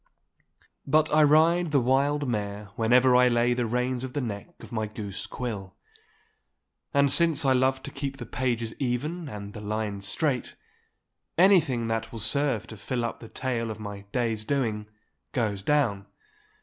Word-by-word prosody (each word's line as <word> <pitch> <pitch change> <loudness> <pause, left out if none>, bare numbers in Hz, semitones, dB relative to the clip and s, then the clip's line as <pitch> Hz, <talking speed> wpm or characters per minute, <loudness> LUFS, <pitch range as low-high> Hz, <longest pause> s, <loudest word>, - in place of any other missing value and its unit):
But 155 +2 +3
I 155 - +6
ride 160 +3 +4
the 145 -2 +3
wild 140 +3 +1
mare 105 -3 -3
whenever 125 +3 +4
I 125 0 +6
lay 120 0 +3
the 120 -1 -1
reins 125 +2 -1
on 130 -1 -6
the 145 - -1
neck 105 +2 -5
of - - -12
my 110 -2 -2
goose 105 -2 -6
quill. 105 -7 -5 1.2
And 140 -1 +3
since 155 -1 +4
I 135 - +5
love 130 +1 +1
to - - -7
keep 140 0 -4
the 120 - -7
pages 115 -1 -2
even 145 +6 -2
and 105 -3 -8
the 105 - -8
lines 105 -2 -2
straight, 135 - 0 0.8
anything 165 - +4
that 115 0 -2
will 115 - -7
serve 115 +1 0
to 110 - -10
fill 120 +3 -2
up 115 - -4
the 115 - -11
tale 120 -3 -2
of 110 0 -6
my 100 -2 -7
day's 115 -3 -1
doing 110 -5 -1 0.5
goes 105 -6 -1
down. 105 -6 +1
125 Hz, 165 wpm, -27 LUFS, 110-140 Hz, 1.2 s, I